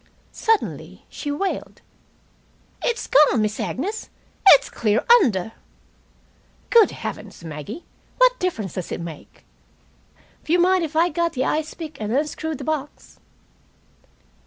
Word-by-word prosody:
Suddenly 450 -2 -2
she 295 - -6
wailed: 380 +7 -4 1.0
"It's 475 - -1
gone, 285 -4 +4
Miss 215 0 -2
Agnes. 405 - -4 0.4
It's 290 - +8
clear 215 0 0 0.2
under!" 220 - 0 1.2
"Good 460 -3 +7
heavens, - - -7
Maggie! 155 - -8 0.3
What - - +4
difference 225 - -2
does 185 - -5
it - - -3
make?" 170 -3 -10 1.0
"W'you 345 +3 +2
mind 365 0 +3
if 315 -1 -5
I 335 +2 +4
got 340 +1 -1
the 260 0 -1
ice 310 0 -2
pick 315 -7 -8
and 210 0 -3
unscrewed 305 +3 -2
the - - -8
box?" 300 -2 -5
305 Hz, 125 wpm, -22 LUFS, 220-355 Hz, 1.2 s, It's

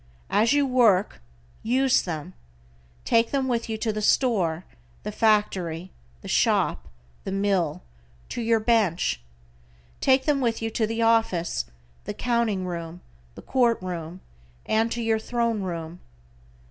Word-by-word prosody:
As 220 +3 +3
you 285 -1 +3
work, 225 - +3 0.4
use 260 +3 +3
them. 155 - -5 0.7
Take 230 -1 +3
them 270 -2 0
with 235 -2 -1
you 220 - -2
to 220 0 -1
the 215 - -3
store, 190 -8 +1 0.4
the 210 - -4
factory, 190 -6 +1 0.3
the - - -8
shop, - - +1 0.4
the 195 - -4
mill, 195 - 0 0.5
to 240 - -4
your 225 0 +2
bench. 215 - +1 0.8
Take 265 0 +3
them 290 -3 +2
with 230 -2 0
you 225 0 -3
to 220 0 0
the 225 +1 -1
office, 190 - +1 0.4
the - - -5
counting 235 -6 0
room, 170 -1 -6 0.3
the - - -11
court 240 -3 +2
room, 180 -1 -6 0.4
and 225 +1 +1
to 235 0 -2
your 225 -1 +1
throne 235 -1 -1
room. 170 -2 -5
220 Hz, 140 wpm, -25 LUFS, 180-235 Hz, 0.8 s, As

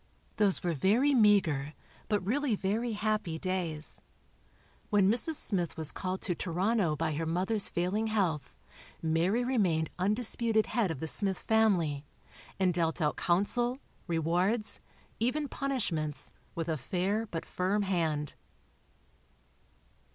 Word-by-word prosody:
Those 205 -3 +2
were 175 -1 0
very 220 - +3
meagre, 190 - +3 0.3
but 205 -3 0
really 260 +2 +1
very 220 +4 -1
happy, 210 -5 -1
days. 170 -4 -3 0.9
When 200 -2 +4
Mrs. 280 +8 +2
Smith 180 - 0
was 160 -2 0
called 185 0 -4
to 180 - 0
Toronto 185 0 0
by 155 +1 -1
her 160 +2 -2
mother's 190 +6 +1
failing 190 +6 -1
health, 180 - -1 0.5
Mary 170 +9 +1
remained 190 -11 +1
undisputed 220 +2 +2
head 230 -6 0
of 160 -5 -4
the 160 - -2
Smith 195 +2 0
family, 180 -11 +2 0.6
and 185 -2 +3
dealt 165 -1 0
out 150 -3 +1
counsel, 240 +8 +1 0.3
rewards, 175 +7 0 0.4
even 280 +6 0
punishments, 165 - -1 0.2
with 165 -1 -3
a 160 -2 -1
fair 190 - -1
but 165 -5 -5
firm 200 +2 0
hand. 160 -6 -1
190 Hz, 125 wpm, -30 LUFS, 165-220 Hz, 0.9 s, When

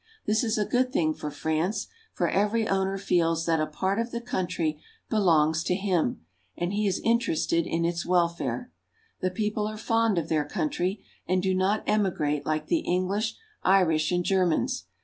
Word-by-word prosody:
This 215 +2 +2
is 220 -2 0
a 210 - +1
good 250 +3 +1
thing 155 -9 +1
for 150 - -5
France, 160 +7 -1 0.3
for - - 0
every 215 +2 +1
owner 195 0 0
feels 165 -4 +1
that 165 -1 +2
a 155 - 0
part 190 +7 -1
of 230 +1 -1
the 235 - -4
country 175 - -2 0.3
belongs 160 -6 +3
to 180 - +1
him, 180 - 0 0.3
and 175 +2 -2
he 210 0 +1
is 190 - 0
interested 170 -7 +1
in 165 0 0
its 170 0 -1
welfare. 175 +7 0 0.5
The 185 - 0
people 210 +2 -1
are 215 0 -5
fond 225 -2 +1
of 165 -2 0
their 155 -2 +1
country, 175 +6 -2 0.2
and 185 +1 +1
do 190 -1 +2
not 190 +3 +1
emigrate 150 -8 0
like 155 0 0
the 335 - +1
English, 195 - -1 0.3
Irish, 165 -5 +3
and 175 -1 0
Germans. 180 - +1
185 Hz, 175 wpm, -27 LUFS, 165-210 Hz, 0.5 s, belongs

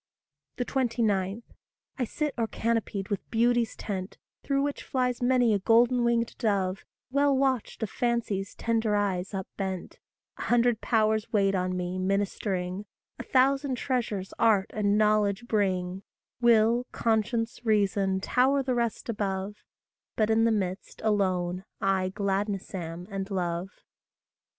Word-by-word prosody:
29. 225 -5 0 0.6
I - - +2
sit 300 +5 -2
o'ercanopied 225 -3 -1
with 200 - -3
Beauty's 235 0 +2
tent, 190 -2 -5 0.2
Through 275 -1 0
which 285 0 -2
flies 250 -2 -1
many 245 -2 +3
a 200 - +2
golden 240 +4 +4
winged 235 -1 +1
dove, 195 -5 0 0.3
Well 280 0 +3
watched 260 -4 0
of 215 - -3
Fancy's 230 -5 -1
tender 225 -2 0
eyes 195 -1 -1
up 190 -1 -4
bent; 190 -2 -4 0.4
A - - -3
hundred 240 -1 +3
Powers 220 -1 +1
wait 200 -3 +3
on 185 -1 -1
me, 180 +1 -3
ministering; 195 0 -1 0.3
A - - -4
thousand 270 +1 +2
treasures 235 -7 -2
Art 215 -4 +3
and 205 -1 +2
Knowledge 215 +1 +2
bring; 190 -4 0 0.4
Will, 235 +1 +4
Conscience, 225 +1 0
Reason 200 -3 +2
tower 270 +6 +2
the 255 -1 0
rest 235 -2 -1
above; 205 -2 -2 0.6
But 215 0 +2
in 225 +1 +4
the 230 - +3
midst, 190 -3 -3
alone, 185 -4 0 0.2
I 190 -1 +1
gladness 200 +1 -2
am 175 -1 -5
and 195 0 -4
love. 180 -1 -2
215 Hz, 130 wpm, -28 LUFS, 195-235 Hz, 0.6 s, golden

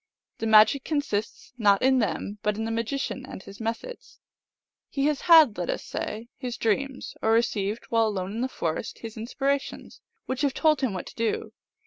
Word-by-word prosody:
The 225 - -1
magic 220 +5 +6
consists 270 -8 -3
not 200 -1 +4
in 265 0 +4
them, 205 0 -2
but 210 0 0
in 220 - -2
the 225 - -2
magician 245 +3 -2
and 195 - -9
his 200 +3 -11
methods. 230 - -5 0.7
He 275 0 -1
has 295 -2 +1
had, 315 - +7
let 175 - -2
us - - -2
say, 220 +2 -5
his 250 -3 -4
dreams, 265 +5 -1
or 220 - +3
received, 220 -1 0
while 225 -1 +3
alone 190 -3 -3
in 225 +3 -3
the 255 - +1
forest, 165 -5 -3
his 225 -1 -8
inspirations, 275 +5 -3 0.2
which 260 +1 -3
have 280 -2 +1
told 310 -3 +3
him 255 -6 0
what 185 - -4
to - - -10
do. 230 -1 -2
230 Hz, 185 wpm, -26 LUFS, 215-270 Hz, 0.7 s, had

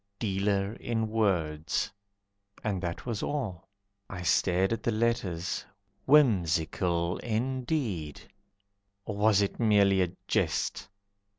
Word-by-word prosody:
Dealer 100 -1 0
in 115 -2 -2
Words." 85 -8 0 0.7
And 100 -4 -1
that 85 -2 -4
was 115 -4 -3
all. 115 - -3 0.4
I 90 -3 -6
stared 95 +3 +2
at 115 - -3
the 120 - 0
letters, 105 -6 -1 0.4
whimsical 90 - +3
Indeed, 120 - -2 0.9
or 105 - -4
was 105 -1 +4
it 100 - -3
merely 100 -4 +4
a 90 -2 0 0.2
jest. - - 0
100 Hz, 105 wpm, -29 LUFS, 90-115 Hz, 0.9 s, was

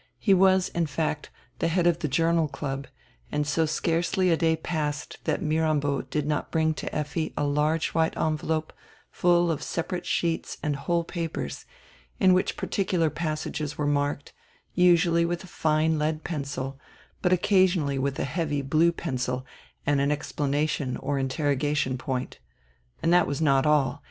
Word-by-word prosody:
He 200 - +3
was, 190 0 +4
in 170 -1 -1
fact, 150 +1 -2 0.3
tire 165 - +1
head 175 +1 +1
of 175 -1 +3
the 155 - -1
Journal 165 +3 +2
Club, 135 -1 -5 0.4
and 150 0 0
so 155 +3 +1
scarcely 170 +3 +1
a - - +5
day 160 0 +2
passed 150 -3 -3
that - - 0
Mirambo 155 -3 +1
did 150 -2 -3
not 150 0 -1
bring 160 -1 +1
to - - -5
Effi 150 +1 -2
a - - +1
large 150 +3 +1
white 160 0 0
envelope 155 0 -1 0.4
full 175 -1 +3
of 155 - -3
separate 175 +2 -3
sheets 165 -1 -1
and 150 -2 0
whole 170 +5 0
papers, 165 -1 -5 0.5
in 185 -2 +6
which 185 - +1
particular 180 -5 0
passages 155 -1 -3
were 150 - -1
marked, 145 0 -1 0.4
usually 170 -1 +4
with 170 +1 -2
a - - -11
fine 155 -1 +1
lead 155 +1 -1
pencil, 140 -4 -4 0.4
but 180 - +2
occasionally 180 -6 +3
with 140 0 -1
a - - -1
heavy 145 -1 -2
blue 155 +5 +3
pencil 130 -6 -3 0.4
and 140 -1 +2
an 140 +1 +2
exclamation 145 -2 -1
or 140 -1 -2
interroga 145 +2 0
tion 130 -3 0
point. 130 -1 -4 0.6
And 165 - +3
that 180 - +5
was 140 - -2
not 140 -2 +3
all. 145 -2 +2
155 Hz, 160 wpm, -26 LUFS, 145-170 Hz, 0.6 s, in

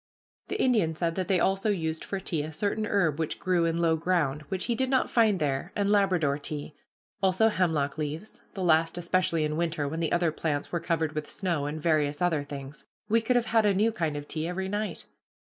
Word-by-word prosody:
The - - -3
Indian 210 -11 +2
said 165 +1 -1
that 185 0 -2
they 185 -2 +2
also 195 +4 +1
used 160 -5 -1
for 195 - -4
tea 170 -5 -2
a 155 +2 -5
certain 205 +6 -1
herb 165 -8 +1
which 160 - -2
grew 180 -2 +1
in 165 0 0
low 165 -1 +3
ground, 160 -4 0
which 185 -1 -2
he 240 - 0
did 260 +2 0
not 260 -1 +1
find 220 -4 +4
there, 145 +3 -1
and 200 0 +1
Labrador 180 -8 +2
tea; 145 0 -5 0.5
also 195 +3 +4
hemlock 155 -7 0
leaves, 155 +7 -5
the 190 - -3
last 165 0 +3
especially 175 -2 +1
in 150 0 -2
winter 165 -3 -1
when 160 +3 -4
the 165 - -1
other 175 -2 +2
plants 150 -2 -2
were 170 - 0
covered 160 -2 -1
with 155 -1 -4
snow; 170 -7 -1
and 155 +1 -5
various 150 -3 +1
other 165 -5 +1
things. 140 -1 -8 0.2
We 225 +2 +4
could 245 +3 +1
have 240 -1 +3
had 225 -1 +5
a 205 -2 +3
new 215 +4 +3
kind 165 -8 -2
of 145 0 -7
tea 160 0 -3
every 190 +2 -3
night. 205 -3 -3
170 Hz, 220 wpm, -28 LUFS, 155-195 Hz, 0.5 s, had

